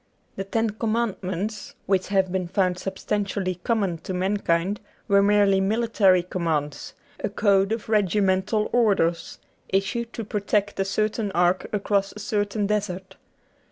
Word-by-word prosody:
The 195 - -4
Ten 225 +2 0
Commandments 215 -2 -2
which 190 -1 +1
have 190 -2 +1
been 185 -1 -1
found 180 -1 0
substantially 195 -1 -2
common 200 -8 0
to 185 +3 -5
mankind 190 0 0 0.3
were 200 0 +5
merely 200 -1 +4
military 200 -3 +3
commands; 160 -5 -3 0.3
a - - 0
code 200 -1 +2
of 225 -1 -3
regimental 205 0 +2
orders, 190 -8 +1 0.3
issued 205 +5 -1
to 230 - -4
protect 205 -1 -1
a 195 - +2
certain 215 +1 -1
ark 180 +1 +2
across 200 -1 0
a 210 - -10
certain 205 0 -1
desert. 195 -3 -2
200 Hz, 130 wpm, -24 LUFS, 185-210 Hz, 0.3 s, were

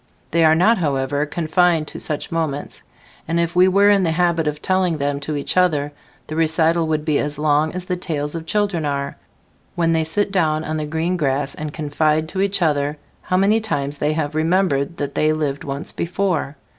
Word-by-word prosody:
They 165 0 +3
are 160 0 +6
not, 210 +7 +4
however, 145 -1 0
confined 165 0 +1
to - - -8
such 150 -2 -3
moments, 155 -4 -3 0.5
and 165 +1 0
if 170 0 -1
we 180 +1 +6
were 200 +2 +5
in 200 -1 +4
the 175 - +1
habit 170 -2 +1
of 150 0 -2
telling 185 -1 +1
them 140 0 -1
to 150 +1 -4
each 145 - -2
other, 155 -6 +2 0.3
the 155 - -6
recital 165 +1 +2
would 155 -1 -1
be 155 -2 +2
as 145 0 -3
long 150 +1 +2
as 180 0 -5
the 180 - -1
tales 150 -5 -3
of 165 -1 -6
children 205 -6 0
are, 140 -1 -2 0.6
when 165 -1 +1
they 160 -1 +2
sit 195 +6 0
down 160 -5 +1
on 155 0 -3
the 155 -1 -3
green 165 +4 -1
grass 140 -2 -1
and 155 -1 -5
confide 155 +1 0
to 190 - -2
each 200 -2 +1
other 145 -1 0 0.2
how 185 - 0
many 205 +4 +3
times 145 -8 -3
they 150 +1 +1
have 155 -1 -2
remembered 165 -2 +1
that 140 -1 -3
they 155 0 +2
lived 145 -3 -2
once 140 +2 -5
before. 175 -5 -2
160 Hz, 205 wpm, -20 LUFS, 150-175 Hz, 0.6 s, are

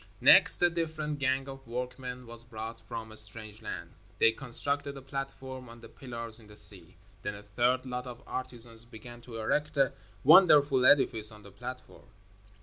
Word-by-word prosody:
Next, - - +7
a 175 - +6
different 155 -3 -3
gang 135 0 0
of 135 -1 -10
workmen 125 +1 -6
was 115 0 -11
brought 115 -1 -8
from 115 -1 -8
a - - -11
strange 110 0 -3
land. 85 -5 -7 0.3
They 115 - +5
constructed 140 +3 +1
a - - -9
platform 135 -2 -7
on 115 0 -13
the - - -12
pillars 115 -3 -3
in 110 - -16
the 105 - -15
sea. 95 -4 -1 0.3
Then 105 - -4
a 100 - -11
third 120 +5 0
lot 125 0 -5
of 125 +2 -10
artisans 120 -3 -3
began 120 +1 -12
to 120 -1 -9
erect 150 +7 -1
a 135 -3 +3 0.3
wonderful 145 -5 +6
edifice 115 -6 +3
on 105 -1 -14
the 100 - -13
platform. - - -10
125 Hz, 175 wpm, -30 LUFS, 115-135 Hz, 0.3 s, Next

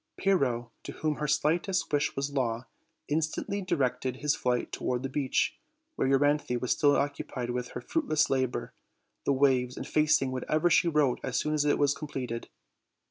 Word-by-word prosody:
Pyrrho, 125 -12 +1
to - - -7
whom 155 -2 -2
her 150 - -2
slightest 155 +5 +1
wish 145 0 +1
was 140 +1 -2
law, 120 -3 -1 0.4
instantly 160 +6 -1
directed 130 -7 -1
his 145 +2 0
flight 125 -1 -1
toward 125 0 -2
the 135 - -2
beach, 135 -1 0 0.4
where - - 0
Euryanthe 140 -1 +2
was 125 - -2
still 145 -2 +4
occupied 135 -3 -2
with 125 0 -4
her - - -5
fruitless 230 - +1
labor, 130 -2 -1 0.5
the - - +3
waves 130 -2 +2
effacing 150 -3 +2
whatever 155 +6 +1
she 170 - +4
wrote 150 -6 +2
as 130 -1 -2
soon 150 +3 0
as 150 -1 +1
it 145 - +3
was 145 -1 +3
completed. 130 -6 -5
140 Hz, 165 wpm, -29 LUFS, 125-150 Hz, 0.5 s, still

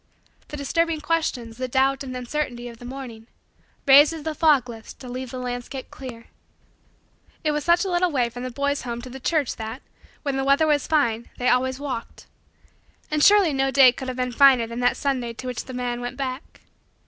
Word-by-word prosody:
The 295 - -7
disturbing 330 +3 0
questions, 290 -8 -2
the 255 0 -3
doubt 270 +2 +1
and 255 -2 -6
the - - -3
uncertainty 245 -1 -3
of 235 -1 -11
the 245 - -10
morning, 245 -4 -8 0.6
raised 285 +3 +7
as 320 -2 -7
the 315 0 -2
fogs 300 -5 +3
lift 225 -2 -10
to 260 - -10
leave 255 +1 -5
the 255 - -7
landscape 250 +1 -5
clear. 245 -3 -9 1.2
It 305 - +2
was 295 -1 -2
such 345 +2 +3
a 380 - -2
little 355 +1 +2
way 255 -6 +1
from 245 - -8
the 255 - -4
boy's 280 +3 -1
home 240 -1 -5
to 255 - -9
the 265 - -8
church 295 0 0
that, 225 +4 -6 0.4
when 280 -2 -1
the 270 - 0
weather 275 +3 +4
was 295 -2 +1
fine, 235 -7 +1
they 250 - +1
always 260 +1 +1
walked. 260 -5 -6 0.9
And 300 -1 +1
surely 400 -6 +6
no 270 0 +1
day 270 -2 +7
could 260 +2 -7
have 255 -1 -4
been 250 0 -1
finer 260 -1 +6
than 235 +1 -6
that 245 0 +2
Sunday 255 -4 -1
to 240 - -9
which 250 -1 -4
the - - -8
man 245 -1 -3
went 245 0 -5
back. 265 0 -6
260 Hz, 210 wpm, -24 LUFS, 245-290 Hz, 1.2 s, raised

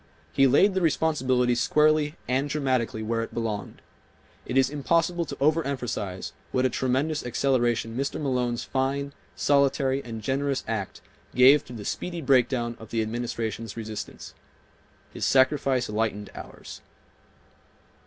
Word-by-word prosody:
He 135 - +5
laid 195 +10 +4
the 190 - 0
responsibility 130 -7 +2
squarely 150 +4 +2
and 135 +3 0
dramatically 130 -6 -1
where 115 +1 -1
it 115 - -6
belonged. 110 -3 -4 0.6
It 130 - -1
is 135 +1 +3
impossible 170 +4 +1
to - - -6
overemphasize 130 - -1 0.2
what 130 0 +1
a 130 - +2
tremendous 135 +6 0
acceleration 120 -3 0
Mr. 135 +3 -2
Malone's 125 -4 -1
fine, 140 +1 -1 0.2
solitary 140 -1 +2
and 115 -2 -7
generous 135 +2 -1
act 105 -4 -4 0.3
gave 130 +3 +7
to 125 - -10
the 105 -4 -7
speedy 175 -1 -3
break 130 -5 +3
down 120 -3 -2
of 110 - -11
the 115 -1 0
Administration's 115 0 -4
resistance. 110 -2 -7 0.8
His - - -6
sacrifice 130 -1 +3
lightened 105 -1 -2
ours. - - -10
130 Hz, 135 wpm, -26 LUFS, 115-140 Hz, 0.8 s, gave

